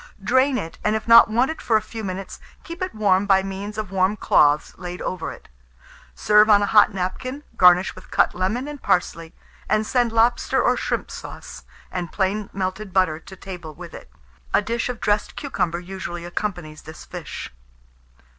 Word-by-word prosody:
Drain 260 +4 +3
it, 165 -8 -6
and 210 +1 +1
if 220 - -4
not 230 0 +9
wanted 255 +8 0
for 225 - +3
a - - -1
few 225 -1 -8
minutes, 190 0 -6 0.2
keep 340 +2 -9
it 370 -7 -3
warm 200 -2 +2
by 190 -1 +4
means 195 +2 -6
of 215 -3 -4
warm 190 +2 +1
cloths 150 -5 +3
laid 180 0 -6
over 180 -3 -4
it. - - -13 0.7
Serve 210 +1 +4
on 205 -1 +6
a - - +3
hot 210 +1 +5
napkin, 255 +9 -4
garnish 180 0 +5
with 185 - -14
cut - - +2
lemon 205 +9 -2
and 295 -1 -8
parsley, 165 -2 -1 0.3
and 215 0 +2
send 245 0 +1
lobster 230 +2 +2
or - - +3
shrimp - - -3
sauce, - - -9 0.3
and 175 -3 -4
plain 200 +1 -1
melted 190 +1 -4
butter 185 -5 +2
to 190 - -13
table 180 -5 -9
with - - -10
it. - - -11 0.5
A - - +4
dish 235 +3 -2
of 245 -2 -5
dressed 210 0 0
cucumber 180 - -2
usually 175 -1 -7
accompanies 175 -4 -5
this 155 +1 -11
fish. - - -8
195 Hz, 180 wpm, -22 LUFS, 180-220 Hz, 0.7 s, not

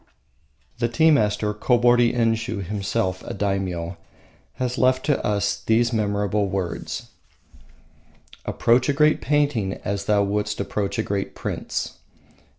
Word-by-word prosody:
The 120 - +2
tea 160 +8 +4
master, 105 -6 +2
Kobori 120 +2 +3
Enshiu, 115 -3 0
himself 95 -1 -2
a - - -6
daimyo, 95 -3 -2 0.6
has 125 0 -3
left 130 0 +3
to 145 -3 +1
us 100 -1 0
these 115 +2 +2
memorable 105 -1 0
words: 95 -2 -4 1.3
"Approach 120 +4 +2
a - - +3
great 150 +2 +3
painting 140 -9 +1
as 100 0 -2
thou 105 -1 +3
wouldst 105 +1 -1
approach 100 0 -2
a - - +1
great 100 -1 -3
prince." - - -4
105 Hz, 125 wpm, -23 LUFS, 100-120 Hz, 1.3 s, tea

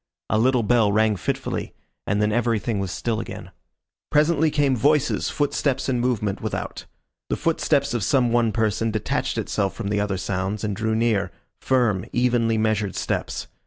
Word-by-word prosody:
A 110 - +3
little 125 0 +3
bell 110 -2 +3
rang 110 0 +3
fitfully, 90 - -3 0.3
and 100 +1 +1
then 105 0 +2
everything 115 -2 0
was 95 -1 -2
still 110 +4 -2
again. 95 -5 -7 0.6
Presently 155 +1 +3
came 145 -3 +2
voices, 145 +4 +2
footsteps 140 -2 0
and 125 -3 0
movement 110 -5 -1
without. - - -4 0.4
The - - +1
footsteps 145 -4 +1
of 120 -4 -1
some 125 +1 +2
one 120 -1 +2
person 110 0 0
detached 110 -1 -2
itself 95 -1 -1
from 105 -3 -4
the 105 0 0
other 100 -2 -1
sounds, 95 +3 -2
and 105 -2 -1
drew 110 +1 -1
near, 110 -5 +1 0.3
firm, 120 -8 +1
evenly 120 -2 +2
measured 110 -3 0
steps. - - -2
115 Hz, 160 wpm, -23 LUFS, 105-125 Hz, 0.6 s, A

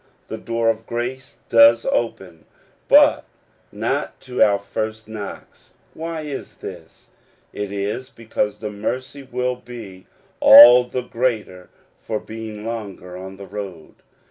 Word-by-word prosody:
The - - -5
door 115 0 0
of 115 0 -9
grace 125 +2 -5
does 115 0 +6
open, 95 -8 -3 0.4
but - - +6 0.5
not - - -3
to 125 -1 -4
our 100 -1 +5
first 110 +2 -5
knocks. 110 -2 -10 0.2
Why 165 0 -5
is 150 -3 -7
this? - - -11 0.4
It 105 -1 -5
is 105 +6 -3
because 110 -4 -3
the 105 -1 -6
mercy 130 +7 -4
will 125 -1 -3
be 110 -7 -11 0.3
all 125 +1 +10
the 125 +1 -4
greater 115 -7 -3 0.3
for 110 -1 -4
being 110 -1 -8
longer 100 -6 -6
on 95 +1 -9
the 100 - -9
road. 95 -4 -8
115 Hz, 130 wpm, -21 LUFS, 100-125 Hz, 0.5 s, all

